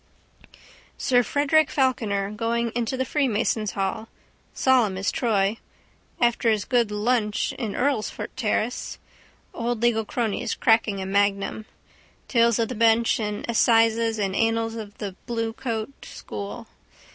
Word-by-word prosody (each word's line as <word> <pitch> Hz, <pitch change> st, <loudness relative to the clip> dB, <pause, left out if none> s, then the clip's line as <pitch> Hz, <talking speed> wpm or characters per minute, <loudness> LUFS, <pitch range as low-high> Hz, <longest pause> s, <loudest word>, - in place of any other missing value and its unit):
Sir 245 Hz, -2 st, +3 dB
Frederick 290 Hz, +5 st, +2 dB
Falkiner 215 Hz, -7 st, 0 dB
going 230 Hz, +1 st, -1 dB
into 240 Hz, +2 st, -2 dB
the 260 Hz, -, 0 dB
freemasons' 230 Hz, -6 st, 0 dB
hall. 195 Hz, +3 st, -2 dB, 0.4 s
Solemn 240 Hz, -8 st, +2 dB
as 195 Hz, +1 st, 0 dB
Troy. 210 Hz, -3 st, +1 dB, 0.6 s
After 235 Hz, -1 st, +2 dB
his 215 Hz, -2 st, +1 dB
good 240 Hz, -4 st, +2 dB
lunch 210 Hz, 0 st, 0 dB
in 220 Hz, -5 st, -4 dB
Earlsfort 260 Hz, -5 st, -1 dB
terrace. 230 Hz, 0 st, -2 dB, 0.6 s
Old 235 Hz, -1 st, -2 dB
legal 230 Hz, -2 st, +3 dB
cronies 225 Hz, 0 st, -2 dB
cracking 225 Hz, -3 st, +2 dB
a -, -, -5 dB
magnum. 200 Hz, +2 st, 0 dB, 0.6 s
Tales 235 Hz, -2 st, +3 dB
of 230 Hz, 0 st, 0 dB
the -, -, -3 dB
bench 230 Hz, 0 st, +3 dB
and 210 Hz, -1 st, -3 dB
assizes 225 Hz, -1 st, +3 dB
and 195 Hz, -2 st, -1 dB
annals 225 Hz, 0 st, +1 dB
of 215 Hz, -3 st, -8 dB
the 200 Hz, -3 st, -5 dB
bluecoat 230 Hz, 0 st, -3 dB
school. 105 Hz, -1 st, -7 dB
225 Hz, 125 wpm, -24 LUFS, 210-240 Hz, 0.6 s, Sir